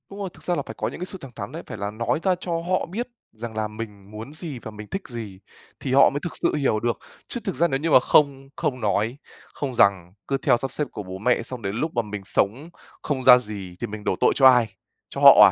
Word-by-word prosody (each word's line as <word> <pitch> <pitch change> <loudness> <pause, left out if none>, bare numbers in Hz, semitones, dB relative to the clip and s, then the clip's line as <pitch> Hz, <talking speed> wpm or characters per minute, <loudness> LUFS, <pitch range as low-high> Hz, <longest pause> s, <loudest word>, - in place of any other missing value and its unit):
Đúng 200 - -9
rồi, 195 -2 -3
thực - - -17
ra 175 - 0
là - - -1
phải - - -7
có - - -1
những - - -6
cái 180 - -3
sự 190 - -8
thẳng 135 - -9
thắn - - -6
đấy, 165 +3 -7
phải - - -6
là 100 +1 -3
nói 115 +7 -1
ra 185 -2 +3
cho 180 0 -6
họ 180 +2 0
biết 220 +8 -4 0.3
rằng 115 0 -7
là 110 -1 -1
mình 105 -2 -9
muốn 110 +7 -8
gì 155 -5 -7
và 110 - -8
mình 105 0 -9
thích 195 - -4
gì 110 -6 -7 0.4
thì 130 - -2
họ 135 +1 +7
mới 140 - -3
thực 175 - -5
sự - - +1
hiểu 135 -7 +1
được. 120 +1 -1 0.3
Chứ 240 - -4
thực 195 - -3
ra 170 - +3
nếu 135 -4 -1
như 165 +3 -1
mà - - +9
không 135 0 +3
không 150 -7 -2
nói, 105 +4 0 0.4
không 135 -4 -4
rằng, 95 -5 +3
cứ 135 - +1
theo 130 -3 +3
sắp 135 +1 -4
xếp 150 +1 -2
của 105 - -6
bố 95 0 -7
mẹ 120 +3 +1
xong 125 +1 -8
đến 100 0 -3
lúc 155 +7 -1
mà 120 - +3
mình 105 -2 -6
sống 115 - 0 0.3
không 135 -3 -2
ra 125 -1 +10
gì 105 -6 -7
thì 120 - -1
mình 105 0 -7
đổ 95 - 0
tội - - +5
cho 135 - +7
ai? 125 -4 +5 0.4
Cho - - -6
họ - - +10
125 Hz, 275 wpm, -24 LUFS, 105-150 Hz, 0.4 s, ra